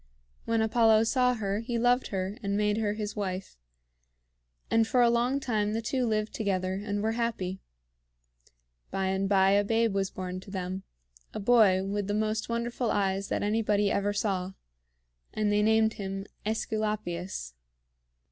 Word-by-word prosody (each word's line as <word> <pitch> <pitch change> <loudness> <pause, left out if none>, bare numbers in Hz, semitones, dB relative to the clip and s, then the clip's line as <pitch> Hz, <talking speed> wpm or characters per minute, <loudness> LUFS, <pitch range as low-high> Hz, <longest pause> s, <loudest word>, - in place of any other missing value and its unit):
When 230 -1 +1
Apollo 220 -1 +4
saw 250 +2 +2
her, 200 -2 -2
he 235 +1 -3
loved 245 +2 +2
her 190 0 -3
and 200 -1 -1
made 210 0 +1
her 210 -2 0
his 210 -1 -4
wife; 190 -2 -4 1.2
and 225 -1 +4
for 245 +1 +3
a 235 - +5
long 245 +3 +1
time 215 -5 -1
the 225 - -1
two 250 +2 0
lived 215 -1 -1
together, 185 -3 -1
and 205 -1 -2
were 220 - +1
happy. 225 -5 -2 1.3
By 190 -1 -1
and 190 0 0
by 195 -1 +4
a 200 +1 +4
babe 225 +1 +1
was 195 -1 0
born 185 0 -5
to 190 - -13
them, 190 -1 -4 0.5
a - - -2
boy 205 -4 +4
with 200 0 -2
the 205 - -1
most 215 +1 -1
wonderful 235 +1 -1
eyes 195 -1 0
that - - -1
anybody 210 -1 +1
ever 200 +1 +1
saw, 195 -3 -1 0.8
and 210 -1 +1
they 205 0 +3
named 220 0 +3
him 195 -1 -5 0.2
AEsculapius. 210 - -3
210 Hz, 160 wpm, -28 LUFS, 195-225 Hz, 1.3 s, a